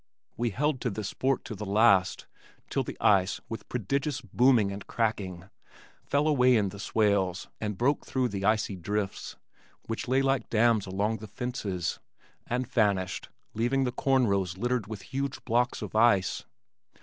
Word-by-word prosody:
We 120 0 0
held 140 +5 -1
to 125 - 0
this 105 -1 -4
sport 135 +1 -1
to - - -5
the 105 - -6
last 100 -2 +3 0.5
till - - +1
the - - -6
ice 95 -2 +3
with 110 -3 -7
prodigious 135 +5 -1
booming 115 -1 +3
and 100 0 -7
cracking 95 -6 -2 0.6
fell 145 +2 +2
away 130 -4 +4
in 105 -3 +2
the 100 +1 -10
swales 100 -4 +1
and 105 -2 -3
broke 140 +6 +1
through 130 -2 -1
the 100 -1 -4
icy 105 -1 +1
drifts 100 +3 -3 0.5
(which 115 +2 -4
lay 130 +2 +2
like 135 -1 0
dams 110 -2 +3
along 100 +4 -1
the 110 +1 -9
fences) 100 -6 -3 0.5
and 125 +2 -1
vanished, 100 -5 0 0.2
leaving 120 +5 +1
the 125 - 0
corn 130 0 +2
rows 95 -4 0
littered 120 0 -1
with 105 -2 -7
huge 135 0 -3
blocks 120 +1 +1
of - - -7
ice. 110 -4 +3
110 Hz, 160 wpm, -28 LUFS, 100-125 Hz, 0.6 s, away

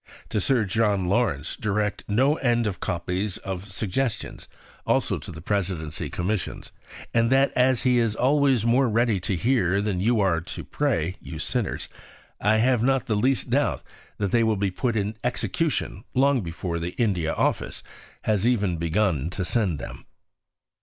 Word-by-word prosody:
to 105 - 0
Sir 120 0 +2
John 100 -2 +1
Lawrence 90 - 0
direct 105 -1 -1
no 130 +8 +3
end 120 -3 +1
of 100 -3 -2
copies 90 +3 -2
of 95 -1 -5
Suggestions 105 +4 -3 0.4
(also - - +1
to - - -9
the 80 - -10
Presidency 90 -6 -2
Commissions); 95 +2 -3 0.4
and 115 +1 +3
that, 135 +1 +4
as 125 -1 +3
he 125 -2 +4
is 115 -2 +1
always 135 -2 +3
more 125 +2 +3
ready 115 -2 +2
to 95 +2 -2
hear 100 -2 +2
than 100 -3 -1
you 115 +4 +2
are 90 -5 +2
to 90 - -7
pray 95 - -1
(you 80 - -7
sinners!), 110 +7 -2 0.5
I 105 +2 +3
have 120 +1 +3
not 135 +1 +2
the 110 - 0
least 130 +5 +1
doubt - - +1 0.3
that 100 -2 -1
they 115 0 +4
will 110 -1 +3
have 100 - -5
been 100 -2 +1
put 120 +5 -1
in 105 +1 -2
execution 125 - -1
long 135 0 +4
before 85 -1 -4
the 85 +1 -4
India 95 -9 0
Office - - -1 0.4
has 105 0 +1
even 100 -8 +1
begun 85 -2 0
to 90 0 -3
send 95 -3 0
them." - - -9
105 Hz, 165 wpm, -25 LUFS, 90-120 Hz, 0.5 s, that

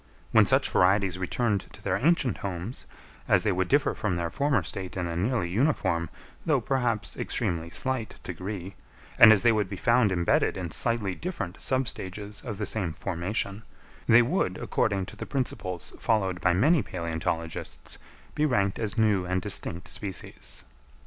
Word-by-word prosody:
When - - +6
such - - +3
varieties 95 0 +3
returned 105 +2 -1
to - - -12
their - - 0
ancient 150 -4 +2
homes, 95 +5 -5 0.4
as - - +4
they 105 - +2
would 95 0 0
differ 145 +5 +3
from 105 -4 -2
their 85 -1 -2
former 140 -2 +1
state 95 -1 -5
in 90 - -1
a 85 -1 -3
nearly 105 +2 0
uniform, 95 - +1 0.3
though - - +2
perhaps 120 -5 -1
extremely 85 -1 -2
slight 130 +3 -2
degree, 95 +2 -6 0.5
and 110 - +11
as 110 -1 +5
they 120 - +6
would 105 -4 0
be 100 - -4
found 115 -1 +3
embedded 85 0 +2
in 90 -3 -4
slightly 115 -3 +1
different 105 - -5
sub 130 -1 +1
stages 100 +2 -5
of 110 -6 -6
the 105 - -2
same 95 -8 -1
formation, 95 +4 -2 0.5
they 120 +1 +7
would, 120 - 0
according 100 -3 0
to - - -11
the - - -7
principles 100 -9 -3
followed 95 -5 0
by 90 - +3
many 145 - +4
palæontologists, 85 -3 -4 0.3
be 150 - 0
ranked 100 -10 +1
as 110 0 -3
new 105 -4 +3
and 90 0 -1
distinct 85 +2 -2
species. 100 -3 -7
100 Hz, 165 wpm, -27 LUFS, 90-115 Hz, 0.5 s, and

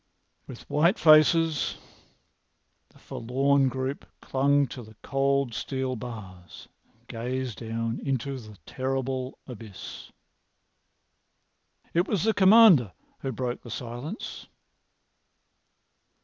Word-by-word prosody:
With - - -11
white 170 +7 +3
faces, 155 0 +4 1.1
the - - -23
forlorn 135 +3 +1
group 130 +2 -4 0.2
clung 140 +1 +2
to 125 - -8
the 110 -1 -14
cold 140 -2 0
steel 130 +1 -3
bars 100 -7 -9 0.2
and - - -35
gazed 125 +1 -4
down 115 0 -3
into 135 0 -2
the 110 -3 -13
terrible 130 0 -3
abyss. 110 -6 -10 1.8
It 175 +3 +2
was 200 -5 0
the 220 +1 +3
Commander 190 - +6 0.3
who 135 - -3
broke 125 0 -3
the 120 - -11
silence. 120 - -6
130 Hz, 100 wpm, -27 LUFS, 120-140 Hz, 1.8 s, Commander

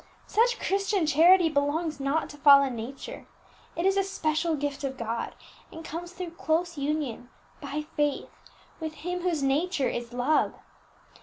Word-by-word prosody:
Such 475 +3 +2
Christian 395 -2 +1
charity 335 +4 +6
belongs 300 +1 0
not 275 +4 0
to 295 - -12
fallen 280 -3 +6
nature; 235 +5 -7 0.5
it 340 - -1
is 390 0 +3
a 390 - +3
special 320 -3 0
gift 290 -1 -3
of 265 -1 -3
God, 230 0 -3 0.4
and 325 0 -9
comes 345 +2 -6
through 360 -2 -6
close 335 +3 -1
union, 280 -4 -3 0.3
by 295 +1 -4
faith, 295 -1 0 0.5
with 315 -1 -5
Him 360 0 -2
whose 340 -5 0
nature 285 +2 +1
is 240 0 -5
love. 250 +5 +1
310 Hz, 150 wpm, -27 LUFS, 275-345 Hz, 0.5 s, charity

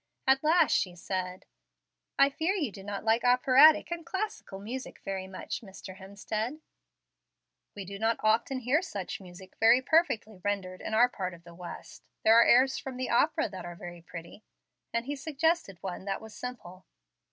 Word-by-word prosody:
At 265 +1 +3
last 325 +3 +4
she 180 -3 +1
said, 185 +1 -4 0.7
"I 275 0 +5
fear 330 +7 0
you 300 - -1
do 195 - -11
not 200 0 -5
like 225 +1 +2
operatic 255 +6 +6
and 340 -1 -3
classical 380 - -4
music 235 +7 -7
very 190 -1 -4
much, 190 0 -6
Mr. 190 -2 -11
Hemstead?" 215 +7 -4 1.2
"We 200 -2 -6
do 195 +1 -8
not 225 +1 +1
often 235 +4 +2
hear 265 +7 +2
such 200 - -5
music 185 0 -13
very 225 +3 +6
perfectly 260 - +1
rendered 190 -3 -2
in 220 - -3
our 240 +3 +6
part 185 -7 -5
of 170 - -18
the 170 0 -13
West. 175 0 -10 0.2
There 220 - +6
are 235 - +8
airs 260 +3 +4
from 260 -2 -7
the 255 - -3
opera 315 +7 +2
that 190 -2 -8
are 175 0 -7
very 175 0 -9
pretty"; 170 +4 -10 0.5
and 230 +1 -1
he 290 +2 -3
suggested 315 - 0
one 190 0 -5
that 195 -1 -2
was 220 -1 -12
simple. 190 -7 -8
220 Hz, 175 wpm, -29 LUFS, 190-265 Hz, 1.2 s, are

